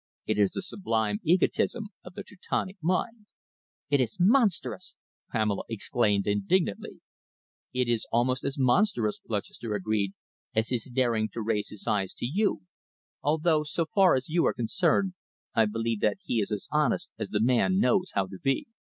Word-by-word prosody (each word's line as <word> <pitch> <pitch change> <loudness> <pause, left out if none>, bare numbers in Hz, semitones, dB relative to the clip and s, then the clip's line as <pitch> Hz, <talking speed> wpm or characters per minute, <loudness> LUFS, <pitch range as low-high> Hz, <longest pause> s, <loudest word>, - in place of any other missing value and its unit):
It - - 0
is 100 -2 +3
the 195 - -3
sublime 110 - -1
egotism 190 +5 +1
of 180 0 -12
the - - -6
Teutonic 190 0 -4
mind." 210 +6 -1 0.6
"It 140 -2 +4
is 115 -3 -2
monstrous!" 205 -1 +2 0.4
Pamela 105 -3 0
exclaimed 105 -2 +1
indignantly. 105 - 0 0.7
"It 125 -1 0
is 120 -2 0
almost 125 +3 +1
as 140 +2 -2
monstrous," 130 - +2
Lutchester 105 +1 -3
agreed, 100 -1 -1 0.4
"as 110 +1 +2
his 120 -3 -1
daring 120 -4 +1
to 115 - -4
raise 105 -1 -1
his 105 - -7
eyes 100 -3 0
to - - -4
you, 190 - 0 0.6
although, 155 +1 +2
so 155 +2 -1
far 190 -2 +4
as 130 - -2
you 170 +2 +1
are - - 0
concerned, 180 - +1 0.4
I 110 - +4
believe 115 +1 -2
that - - +1
he 120 - 0
is 100 - -2
as 105 -2 -2
honest - - +1
as - - -3
the 105 - 0
man 125 - +3
knows 195 -3 +2
how 100 - +2
to 95 0 -10
be." 135 -1 0
125 Hz, 165 wpm, -28 LUFS, 110-180 Hz, 0.7 s, It